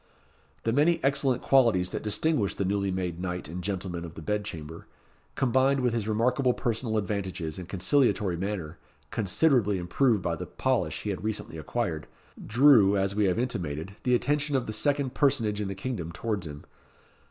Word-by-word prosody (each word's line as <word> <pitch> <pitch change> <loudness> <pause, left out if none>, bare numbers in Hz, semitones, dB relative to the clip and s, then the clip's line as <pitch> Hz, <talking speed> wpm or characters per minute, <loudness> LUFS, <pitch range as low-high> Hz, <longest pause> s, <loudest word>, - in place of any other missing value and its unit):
The 115 - 0
many 160 +5 +3
excellent 135 -2 +1
qualities 115 -10 +3
that - - -3
distinguished 110 +1 0
the 100 - 0
newly 100 +1 0
made 90 -2 -3
knight 90 -3 -4
and 90 +3 -6
gentleman 90 -3 -3
of 85 -1 -9
the 80 - -8
bed 105 +4 -1
chamber, 80 -4 -8 0.5
combined 135 +1 +2
with 125 -2 +1
his 115 -3 -2
remarkable 125 +4 +2
personal 115 -2 -1
advantages 95 -5 -3
and 90 -1 -9
conciliatory 100 0 +2
manner, 90 -3 -4 0.3
considerably 110 - +2
improved 100 +4 +1
by 85 - 0
the - - -7
polish - - -1
he - - -1
had - - -5
recently 105 -6 -3
acquired, 85 -3 -3 0.4
drew, 115 -5 +5
as 95 0 0
we 105 0 +2
have 90 -2 +1
intimated, 95 - -3
the 125 -1 +2
attention 145 +3 0
of 130 - +1
the 110 - -4
second 140 +3 0
personage 110 -7 +1
in 100 - -2
the 95 - -4
kingdom 95 -6 -4
towards 100 0 -3
him. 75 -1 -9
105 Hz, 175 wpm, -28 LUFS, 90-125 Hz, 0.5 s, drew